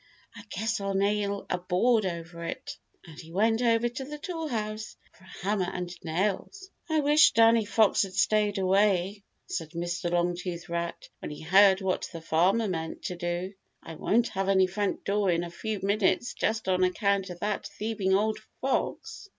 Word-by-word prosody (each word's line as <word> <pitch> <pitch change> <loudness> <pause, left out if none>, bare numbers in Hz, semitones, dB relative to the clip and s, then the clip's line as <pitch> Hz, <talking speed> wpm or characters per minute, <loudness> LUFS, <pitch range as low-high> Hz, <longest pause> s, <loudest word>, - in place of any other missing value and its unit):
"I 215 - -9
guess 220 +1 -2
I'll 195 0 -2
nail 200 0 0
a 180 - -1
board 195 +4 +2
over 170 -1 -6
it," - - -6 0.3
and 160 -2 -12
he 165 -1 -11
went 225 +5 +2
over 230 -1 +3
to 240 +3 -5
the 300 +3 -7
Toolhouse 240 -11 -4 0.2
for 185 - -20
a - - -13
hammer 195 -3 +1
and 180 -1 -5
nails. 205 - -2 0.2
"I 315 -1 +2
wish 295 +2 +5
Danny 225 -1 +5
Fox 215 0 +3
had 190 -2 -3
stayed 210 +1 +2
away," 195 0 +2 0.2
said 160 -3 -5
Mr. 175 0 -2
Longtooth 175 0 -2
Rat 170 0 -4
when - - -6
he 150 - -8
heard 190 +3 +6
what 190 -1 -1
the 165 - -7
Farmer 180 +8 +2
meant 160 -4 -4
to 180 - -3
do. 175 +2 -3 0.3
"I 165 - -8
won't 230 +9 +1
have 195 0 -2
any 190 -1 +5
front 195 +2 -2
door 200 -1 +1
in 170 -1 +1
a 170 - -6
few 215 +3 -4
minutes 200 +3 +1
just 220 -2 -1
on 185 -1 +2
account 195 +1 +1
of 175 -1 -8
that 210 -1 -2
thieving 205 -3 -1
old 215 +2 +1 0.2
fox." 415 +11 -2
195 Hz, 180 wpm, -28 LUFS, 180-220 Hz, 0.3 s, heard